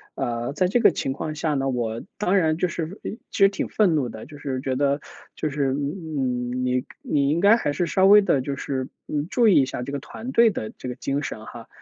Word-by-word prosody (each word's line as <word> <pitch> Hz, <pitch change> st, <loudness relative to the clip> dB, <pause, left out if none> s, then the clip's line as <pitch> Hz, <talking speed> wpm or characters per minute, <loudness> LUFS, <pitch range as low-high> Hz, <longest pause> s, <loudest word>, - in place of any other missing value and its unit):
呃， 120 Hz, -1 st, -2 dB
在 185 Hz, +3 st, +2 dB
这 240 Hz, +6 st, +2 dB
个 230 Hz, -, +7 dB
情 135 Hz, -, -2 dB
况 155 Hz, +2 st, -5 dB
下 150 Hz, 0 st, -1 dB
呢， 135 Hz, -1 st, 0 dB
我 115 Hz, -3 st, -2 dB, 0.2 s
当 200 Hz, -1 st, +1 dB
然 160 Hz, -3 st, +2 dB
就 180 Hz, -, +1 dB
是 170 Hz, +3 st, -5 dB
呃 -, -, -3 dB, 0.2 s
其 -, -, -7 dB
实 195 Hz, -1 st, +7 dB
挺 195 Hz, -, -3 dB
愤 200 Hz, -6 st, +3 dB
怒 135 Hz, -6 st, 0 dB
的， 110 Hz, -, -9 dB
就 145 Hz, -1 st, -12 dB
是 130 Hz, -3 st, -3 dB
觉 130 Hz, -1 st, -1 dB
得 140 Hz, +1 st, +1 dB, 0.4 s
就 155 Hz, -, -2 dB
是 140 Hz, -2 st, 0 dB
嗯， 135 Hz, -5 st, -2 dB
你 125 Hz, 0 st, 0 dB, 0.2 s
你 145 Hz, -, +1 dB
应 160 Hz, +3 st, +1 dB
该 205 Hz, +4 st, +6 dB
还 145 Hz, -11 st, -1 dB
是 170 Hz, +4 st, 0 dB
稍 190 Hz, +2 st, +3 dB
微 210 Hz, +1 st, +8 dB
地 135 Hz, -8 st, +2 dB
就 140 Hz, +1 st, -3 dB
是， 130 Hz, -1 st, -3 dB, 0.2 s
嗯， 150 Hz, +1 st, -2 dB
注 235 Hz, -2 st, +3 dB
意 185 Hz, -9 st, +6 dB
一 -, -, +2 dB
下 125 Hz, -, -4 dB
这 140 Hz, -, -5 dB
个 140 Hz, -, -3 dB
团 230 Hz, -, -8 dB
队 230 Hz, -2 st, +6 dB
的 110 Hz, -, -4 dB
这 125 Hz, -, -8 dB
个 125 Hz, -, -5 dB
精 140 Hz, +1 st, -2 dB
神 110 Hz, -6 st, -6 dB
哈。 115 Hz, -1 st, -10 dB
145 Hz, 270 characters per minute, -24 LUFS, 130-180 Hz, 0.4 s, 微